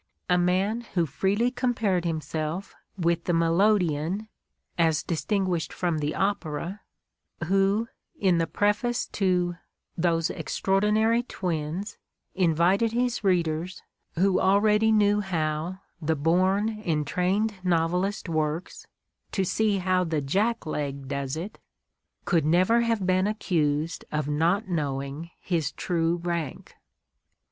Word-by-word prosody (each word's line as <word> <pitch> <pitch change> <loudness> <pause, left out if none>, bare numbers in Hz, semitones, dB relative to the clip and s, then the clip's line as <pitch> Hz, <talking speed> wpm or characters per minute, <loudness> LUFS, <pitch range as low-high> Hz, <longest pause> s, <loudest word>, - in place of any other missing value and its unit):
A - - +6
man 190 +6 +1
who 170 -2 +3
freely 200 - 0
compared 225 -8 0
himself 160 +2 -3 0.2
with 170 -1 0
the 175 - +1
melodeon, 175 +1 +2 0.5
as 160 -3 +2
distinguished 180 0 -1
from 170 -3 -1
the 150 0 -2
opera, 190 -1 -2 0.6
who, 195 +5 +2 0.3
in 185 -4 +3
the 165 - +1
preface 210 +4 0
to 180 -3 0 0.4
"Those 165 -1 +1
Extraordinary 210 +4 +1
Twins," 180 -2 -4 0.3
invited 185 +5 +2
his 245 -1 0
readers, 175 -1 0 0.3
who 190 +2 +3
already 210 +3 +4
knew 210 -1 +4
how 170 0 -2 0.2
"the 160 +1 +1
born 190 +8 +1
and 155 -5 0
trained 190 +8 0
novelist 180 +4 0
works," 155 +1 -2 0.5
to 195 - +1
see 210 +2 +1
how 185 0 +1
the 160 -3 -1
"jack 200 +12 0
leg" 140 -3 -4
does 140 0 -3
it, 180 +6 -6 0.7
.could 170 -5 +2
never 185 +9 +3
have 230 -4 0
been 185 +1 +2
accused 160 -7 -1
of 150 -2 -1
not 170 +8 +1
knowing 145 -1 -3
his 165 -6 -1
true 170 -1 0
rank. 170 -4 -4
180 Hz, 120 wpm, -26 LUFS, 160-200 Hz, 0.7 s, A